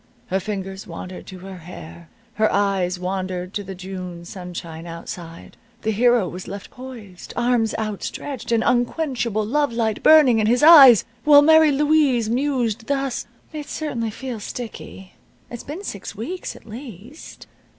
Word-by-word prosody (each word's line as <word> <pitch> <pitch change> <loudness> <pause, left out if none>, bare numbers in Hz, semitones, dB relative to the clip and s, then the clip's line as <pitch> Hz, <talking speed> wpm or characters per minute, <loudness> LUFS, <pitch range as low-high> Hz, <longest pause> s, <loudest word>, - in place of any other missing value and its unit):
Her 190 - +1
fingers 195 -1 -5
wandered 180 +2 -8
to 185 - -9
her 190 0 -9
hair. 170 -1 -11 0.2
Her 215 0 +2
eyes 195 -3 +1
wandered 185 0 -4
to 205 - -3
the 195 0 -8
June 180 -2 -7
sunshine 175 -2 -8
outside. 165 0 -9 0.3
The 220 - +1
hero 235 -2 +3
was 180 +2 -8
left 200 +1 -8
poised, 235 -8 -11
arms 240 -2 +1
outstretched, 220 +5 -5
and 225 -1 +2
unquenchable 240 -3 0
love 290 +4 +1
light 225 -2 -1
burning 290 -7 +6
in 215 - +2
his 245 +4 +2
eyes, 280 - +9 0.2
while 290 -1 +7
Mary 315 0 +6
Louise 280 -6 +2
mused, 245 -4 -1
thus: 275 -2 -2 0.3
"It 300 -2 -6
certainly 240 -8 -3
feels 230 -1 -6
sticky. 215 -5 -8 0.4
It's 240 - -6
been 320 +8 -7
six 200 - -7
weeks, 305 - -5
at - - -15
least. 230 - -11
220 Hz, 150 wpm, -22 LUFS, 190-260 Hz, 0.4 s, eyes